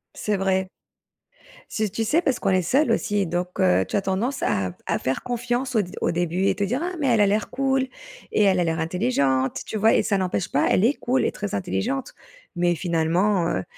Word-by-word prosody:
C'est 210 Hz, -2 st, -1 dB
vrai. 190 Hz, -1 st, 0 dB, 1.0 s
Si, 215 Hz, -1 st, -1 dB
tu 215 Hz, +4 st, -2 dB
sais, 300 Hz, +10 st, +2 dB
parce 270 Hz, -6 st, 0 dB
qu'on 195 Hz, -, 0 dB
est 185 Hz, -1 st, +3 dB
seul 260 Hz, -, +2 dB
aussi, 205 Hz, -3 st, 0 dB
donc 180 Hz, +3 st, -3 dB
heu, 185 Hz, -1 st, +3 dB
tu -, -, -4 dB
as 200 Hz, -, +2 dB
tendance 210 Hz, +9 st, -2 dB
à 95 Hz, -2 st, 0 dB
à -, -, -1 dB
faire 130 Hz, +1 st, -2 dB
confiance 245 Hz, +1 st, -2 dB
au 215 Hz, -, +4 dB
d 180 Hz, -, -7 dB
au -, -, +1 dB
début, 175 Hz, +2 st, -1 dB
et -, -, +2 dB
te 200 Hz, -, -2 dB
dire: 250 Hz, -, -1 dB
«Ah 360 Hz, -, -3 dB
mais 275 Hz, -, 0 dB
elle 230 Hz, -4 st, +4 dB
a 205 Hz, -, +5 dB
l'air 210 Hz, +1 st, 0 dB
cool 265 Hz, -1 st, 0 dB, 0.4 s
et 210 Hz, -, +3 dB
elle 190 Hz, -2 st, +3 dB
a -, -, +3 dB
l'air 165 Hz, -1 st, -1 dB
intelligente» 160 Hz, -, 0 dB
tu 220 Hz, -, -4 dB
vois? 220 Hz, +2 st, +4 dB
Et -, -, +3 dB
ça 200 Hz, -, +1 dB
n'empêche 185 Hz, -1 st, -1 dB
pas, 145 Hz, -, +2 dB
elle 190 Hz, -, +3 dB
est 265 Hz, -, +4 dB
cool 255 Hz, +2 st, 0 dB
et -, -, +1 dB
très 205 Hz, -2 st, -4 dB
intelligente, 245 Hz, +8 st, -2 dB, 0.4 s
mais 175 Hz, 0 st, +2 dB
finalement, 170 Hz, +2 st, +1 dB
heu, 95 Hz, -, -1 dB
195 Hz, 225 wpm, -23 LUFS, 175-240 Hz, 1.0 s, a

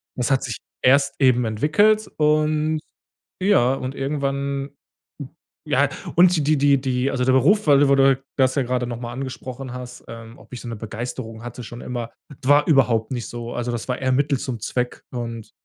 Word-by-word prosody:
das 125 Hz, -2 st, -1 dB
hat 135 Hz, -2 st, +2 dB
sich 115 Hz, -4 st, -4 dB, 0.3 s
erst 140 Hz, +2 st, +4 dB
eben 125 Hz, -3 st, +4 dB
entwickelt 155 Hz, -, +2 dB
und 155 Hz, +1 st, +2 dB, 0.6 s
ja 185 Hz, -11 st, +4 dB
und 130 Hz, 0 st, -5 dB
irgendwann 140 Hz, 0 st, -2 dB, 1.0 s
ja 145 Hz, -1 st, +2 dB, 0.3 s
und 180 Hz, +1 st, +6 dB
die 155 Hz, -, 0 dB
die 155 Hz, +1 st, +2 dB
die 140 Hz, 0 st, +4 dB
die 130 Hz, 0 st, 0 dB
also, 125 Hz, -2 st, -1 dB
der 130 Hz, -, +3 dB
Beruf, 180 Hz, -, +4 dB
weil 140 Hz, -2 st, +6 dB
du 145 Hz, -, +4 dB
wo 140 Hz, -, +5 dB
du 135 Hz, -1 st, +4 dB, 0.2 s
das 130 Hz, +1 st, +3 dB
ja 140 Hz, -, +2 dB
grade 125 Hz, 0 st, -1 dB
noch 120 Hz, -1 st, -5 dB
mal 120 Hz, -1 st, -6 dB
angesprochen 130 Hz, 0 st, -6 dB
hast, 125 Hz, -1 st, -9 dB
ähm, 115 Hz, +1 st, -10 dB
ob -, -, -17 dB
ich 120 Hz, -, -6 dB
so -, -, -9 dB
'ne 115 Hz, -, -4 dB
Begeisterung 115 Hz, +1 st, -6 dB
hatte 120 Hz, +1 st, -7 dB
schon 120 Hz, +1 st, -9 dB
immer. 120 Hz, -2 st, -5 dB, 0.2 s
D 140 Hz, -2 st, -10 dB
war 145 Hz, +1 st, +5 dB
überhaupt 120 Hz, -7 st, +3 dB
nicht 120 Hz, -3 st, -3 dB
so. 120 Hz, 0 st, -6 dB
Also, 120 Hz, 0 st, -2 dB
das 120 Hz, +1 st, -4 dB
war 125 Hz, -, 0 dB
eher 130 Hz, -1 st, 0 dB
Mittel 140 Hz, 0 st, +1 dB
zum 120 Hz, -4 st, -4 dB
Zweck 125 Hz, +3 st, -3 dB
und 115 Hz, -3 st, -6 dB
130 Hz, 200 wpm, -22 LUFS, 120-140 Hz, 1.0 s, und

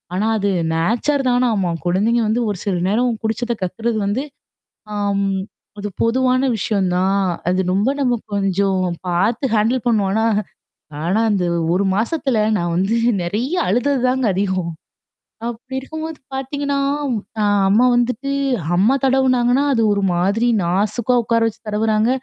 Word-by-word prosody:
ஆனா 210 Hz, +4 st, 0 dB
அது 200 Hz, 0 st, 0 dB, 0.3 s
நேச்சர் 240 Hz, -, +1 dB
தான 245 Hz, 0 st, +2 dB
ஆமா. 185 Hz, -3 st, 0 dB, 0.2 s
குழந்தைங்க 215 Hz, +7 st, +2 dB
வந்து 230 Hz, +3 st, +1 dB
ஒரு 200 Hz, -, -2 dB
சில 195 Hz, -3 st, 0 dB
நேரம் 240 Hz, +4 st, +2 dB
குடிச்சத 235 Hz, +2 st, -1 dB
கக்கறது 220 Hz, +5 st, -2 dB
வந்து 220 Hz, +7 st, 0 dB, 0.7 s
ஆம், 200 Hz, -1 st, 0 dB, 0.5 s
அது 205 Hz, 0 st, -4 dB
பொதுவான 255 Hz, +2 st, +2 dB
விஷயம் 195 Hz, -2 st, 0 dB
தான். 195 Hz, +1 st, +1 dB, 0.2 s
அது 185 Hz, +1 st, +1 dB
ரொம்ப 205 Hz, +7 st, +2 dB
நம்ம 250 Hz, -3 st, +2 dB, 0.2 s
கொஞ்சம் 195 Hz, -1 st, +1 dB, 0.3 s
பார்த்து 210 Hz, +10 st, +1 dB
ஹேண்டில் 230 Hz, +4 st, +1 dB
பண்ணுவோம். 210 Hz, -5 st, +2 dB
ஆனா 220 Hz, +1 st, +2 dB, 0.8 s
ஆனா, 190 Hz, +6 st, +1 dB
அந்த 190 Hz, -4 st, +1 dB, 0.3 s
1 195 Hz, +2 st, +1 dB
மாசத்துல 245 Hz, +3 st, 0 dB, 0.2 s
நான் 170 Hz, -1 st, -1 dB
வந்து 195 Hz, +6 st, +1 dB, 0.3 s
நெறைய 230 Hz, -, -2 dB
அழுதது 250 Hz, +7 st, +1 dB
தாங்க 255 Hz, -1 st, +1 dB
அதிகம். 185 Hz, -3 st, -1 dB, 0.8 s
அப்படி 240 Hz, +3 st, -7 dB
இருக்கும்போது 315 Hz, +3 st, -7 dB
பார்த்தீங்கன்னா, 280 Hz, +1 st, -2 dB, 0.6 s
அ -, -, +2 dB, 0.3 s
அம்மா 230 Hz, +5 st, +4 dB
வந்துட்டு 250 Hz, +3 st, 0 dB, 0.4 s
அம்மா 210 Hz, +9 st, +4 dB
தடவுனாங்கன்னா, 260 Hz, 0 st, +3 dB
அது 230 Hz, -, +1 dB
ஒரு 200 Hz, -, -1 dB
மாதிரி 200 Hz, +7 st, +1 dB, 0.2 s
நாசுக்கா 210 Hz, +7 st, 0 dB
உட்கார 230 Hz, +1 st, +1 dB
வச்சு 220 Hz, -, -6 dB
தடவுறாங்க. 215 Hz, +2 st, +1 dB
220 Hz, 140 wpm, -19 LUFS, 195-250 Hz, 0.8 s, அம்மா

